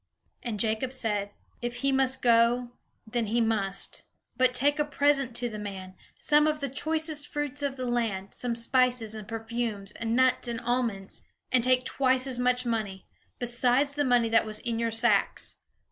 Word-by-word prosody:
And 225 -4 -4
Jacob 225 +4 0
said, 210 -6 0 0.3
"If 240 0 -3
he 275 - +3
must 265 -1 +2
go, 240 +1 +3 0.3
then 230 0 -2
he 230 +3 +1
must. 215 -4 -1 0.3
But 255 0 +3
take 285 +4 +1
a - - +4
present 285 -4 +1
to 245 0 -2
the 215 -2 -6
man, 190 -2 -7 0.2
some 295 +1 +3
of 305 0 0
the 280 -1 -3
choicest 310 +2 -1
fruits 290 -1 -4
of 280 -2 -2
the 255 -1 -4
land, 225 -6 -2
some 245 -2 -2
spices, 245 -1 +1
and 215 -2 -8
perfumes, 225 -3 -4
and 230 +1 -3
nuts, 255 0 +2
and 235 -1 -3
almonds. 235 -5 -2 0.3
And 255 -2 +3
take 255 0 +3
twice 260 0 +2
as 255 -2 -1
much 250 0 +1
money, 215 -5 -3 0.3
besides 245 +3 +1
the 290 0 0
money 245 -3 +3
that 225 0 +4
was 215 0 +2
in 230 +1 -3
your 230 0 0
sacks. 225 -3 +2
240 Hz, 175 wpm, -28 LUFS, 225-260 Hz, 0.3 s, a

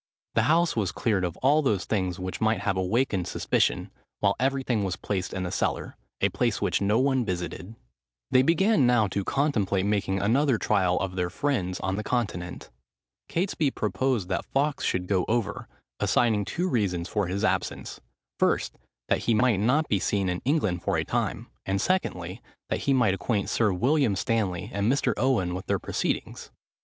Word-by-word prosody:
The 110 - +3
house 170 +1 +3
was 105 -5 0
cleared 105 -5 0
of 90 -1 -3
all 145 +4 +5
those 105 -10 0
things 95 -4 -1
which 95 -1 -5
might 110 0 +2
have 95 - 0
awakened 95 0 0
suspicion, - - 0 0.3
while 100 -1 +2
everything 130 -4 0
was 95 -2 -1
placed 95 -3 -3
in 95 - -3
the 90 - -3
cellar,—a - - -2
place - - 0
which - - 0
no 105 +2 +2
one 130 0 +2
visited. 90 +2 -5 0.6
They 130 - +6
began 165 - +3
now 120 -3 +4
to 100 +1 -2
contemplate 105 -9 0
making 100 -2 0
another 125 +6 +2
trial 95 -4 +1
of 95 -1 -3
their 90 -1 -1
friends 95 -4 -1
on 95 0 -1
the 105 - -3
Continent. 95 - -3 0.6
Catesby 165 -4 0
proposed 110 0 0
that 95 - -1
Fawkes 145 +1 0
should 90 0 0
go 95 -1 +1
over, 110 -3 -1 0.3
assigning 110 -4 +2
two 180 - -2
reasons 95 - 0
for 105 -3 -1
his 100 +4 -2
absence; 110 - -2 0.4
first, - - +1 0.3
that - - 0
he 115 - +3
might 115 -2 +3
not 140 +9 +2
be 100 - +1
seen 95 0 0
in 90 0 -2
England 110 - +1
for - - 0
a - - -1
time; - - -2 0.2
and 95 0 -1
secondly, 95 - -1 0.3
that - - -1
he - - +5
might 115 -7 +3
acquaint 100 +1 -1
Sir 110 -3 +2
William 125 - +2
Stanley 100 -5 -1
and 100 +4 +1
Mr. 140 - +1
Owen 115 -9 +1
with 90 +1 -6
their - - +1
proceedings. - - -3
105 Hz, 175 wpm, -26 LUFS, 95-130 Hz, 0.6 s, They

